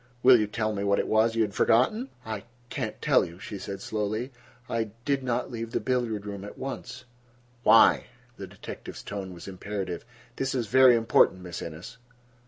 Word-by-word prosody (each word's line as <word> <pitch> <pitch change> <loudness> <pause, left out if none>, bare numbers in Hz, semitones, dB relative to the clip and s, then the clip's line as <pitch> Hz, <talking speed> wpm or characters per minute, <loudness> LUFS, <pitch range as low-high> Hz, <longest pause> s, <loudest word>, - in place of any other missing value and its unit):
"Will 125 -1 +8
you 105 - +1
tell 110 0 -1
me 100 -1 -3
what 100 0 +2
it - - 0
was 110 +1 +3
you 115 - +3
had 105 -2 -3
forgotten?" 215 - +2 0.2
"I 110 -1 -5 0.2
can - - -2
not - - -18
tell - - +4
you," 85 +1 -8
she 100 +2 -7
said 100 0 -6
slowly. 110 +4 -2 0.4
"I—I 115 -1 -1 0.2
did 140 -1 +1
not 125 -1 -2
leave 115 0 -5
the - - +1
billiard 120 -5 -1
room 100 -1 -6
at 105 - -9
once—" 130 -1 -6 0.6
"Why?" 115 -2 +6 0.3
The 95 - -7
detective's - - -9
tone 100 -2 -5
was 85 +1 -10
imperative. 95 -2 -5 0.3
"This 135 0 -1
is 120 -3 0
very 130 +3 +6
important, 115 -5 +3
Miss 90 -1 -6
Innes." 90 +9 -8
110 Hz, 190 wpm, -27 LUFS, 100-120 Hz, 0.6 s, Will